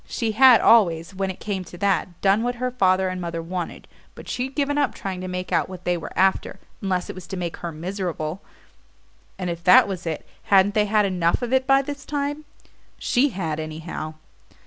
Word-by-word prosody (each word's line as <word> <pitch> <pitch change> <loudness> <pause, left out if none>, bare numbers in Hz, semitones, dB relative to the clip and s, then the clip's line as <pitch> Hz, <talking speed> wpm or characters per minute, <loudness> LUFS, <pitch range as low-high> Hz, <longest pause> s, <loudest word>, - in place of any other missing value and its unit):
She 230 -2 -2
had 255 +1 +7
always, 170 -6 +4
when 190 0 -2
it 185 - -6
came 195 -3 -3
to 175 - -11
that, 185 -2 0
done 200 +2 +3
what 245 +1 -1
her 250 +1 -2
father 190 -5 +2
and 185 0 -4
mother 170 -1 -4
wanted, 175 +1 -5 0.3
but - - -11
she'd 260 +2 -3
given 290 0 0
up 285 - 0
trying 190 -2 -5
to 185 - -5
make 180 0 -5
out - - +1
what 185 -1 -9
they 180 - +2
were 170 - -6
after, 190 0 +1 0.2
unless 185 -2 -1
it - - -6
was 185 -2 -10
to 190 - -5
make 175 -2 -4
her 170 - -5
miserable; 175 0 -4 1.0
and 185 - -4
if 170 0 -7
that 180 +2 +7
was 185 -3 -5
it, 160 - -4 0.2
hadn't 200 0 +4
they 210 -1 +3
had 210 0 +3
enough 180 +2 +1
of 245 +1 -2
it 260 0 +2
by 270 0 +5
this 285 0 -6
time? 290 +1 -3 0.5
She 270 +4 +2
had, 165 - -3
anyhow. 155 0 -6
190 Hz, 210 wpm, -23 LUFS, 175-230 Hz, 1.0 s, had